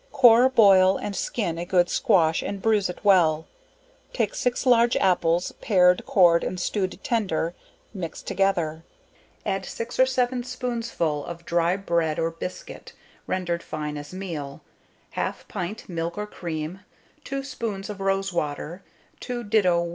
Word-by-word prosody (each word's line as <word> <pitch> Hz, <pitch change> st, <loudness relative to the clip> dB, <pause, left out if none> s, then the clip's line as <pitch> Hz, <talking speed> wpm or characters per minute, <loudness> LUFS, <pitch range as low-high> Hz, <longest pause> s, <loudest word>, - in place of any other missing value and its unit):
Core, 250 Hz, -2 st, +6 dB
boil 195 Hz, -6 st, +6 dB
and 205 Hz, -, -5 dB
skin 175 Hz, -8 st, -2 dB
a -, -, -2 dB
good 175 Hz, -1 st, +3 dB
squash, 165 Hz, -4 st, +2 dB
and 200 Hz, -, -4 dB
bruize 210 Hz, -2 st, +2 dB
it 180 Hz, -, -6 dB
well; 165 Hz, -5 st, +4 dB, 0.7 s
take -, -, 0 dB
6 250 Hz, +1 st, -1 dB
large 240 Hz, -1 st, +4 dB
apples, 175 Hz, -2 st, +2 dB
pared, 180 Hz, -4 st, +3 dB
cored, 170 Hz, -3 st, +5 dB
and 185 Hz, -, -3 dB
stewed 185 Hz, +1 st, -2 dB
tender, 190 Hz, -, -1 dB, 0.4 s
mix 180 Hz, -5 st, -6 dB
together; 170 Hz, -5 st, 0 dB, 0.6 s
add 195 Hz, 0 st, -1 dB
6 230 Hz, +6 st, -6 dB
or 260 Hz, -, +6 dB
7 255 Hz, -1 st, 0 dB
spoonsful 230 Hz, -, -2 dB
of 170 Hz, 0 st, -8 dB
dry 170 Hz, +2 st, +1 dB
bread 170 Hz, -5 st, 0 dB
or 165 Hz, 0 st, 0 dB
biscuit, 165 Hz, +2 st, -8 dB, 0.3 s
rendered 175 Hz, -2 st, -1 dB
fine 150 Hz, -1 st, -5 dB
as 145 Hz, 0 st, -8 dB
meal, 165 Hz, -7 st, -6 dB, 0.5 s
half -, -, -4 dB
pint 180 Hz, +5 st, -5 dB
milk 170 Hz, 0 st, -4 dB
or 210 Hz, -, -2 dB
cream, 170 Hz, -3 st, -5 dB, 0.4 s
2 275 Hz, 0 st, -4 dB
spoons 230 Hz, -7 st, -5 dB
of 205 Hz, -2 st, -7 dB
rose 195 Hz, 0 st, 0 dB
water, 160 Hz, +2 st, -3 dB, 0.4 s
2 245 Hz, -1 st, -4 dB
do. 180 Hz, -6 st, +2 dB
185 Hz, 145 wpm, -25 LUFS, 170-220 Hz, 0.7 s, Core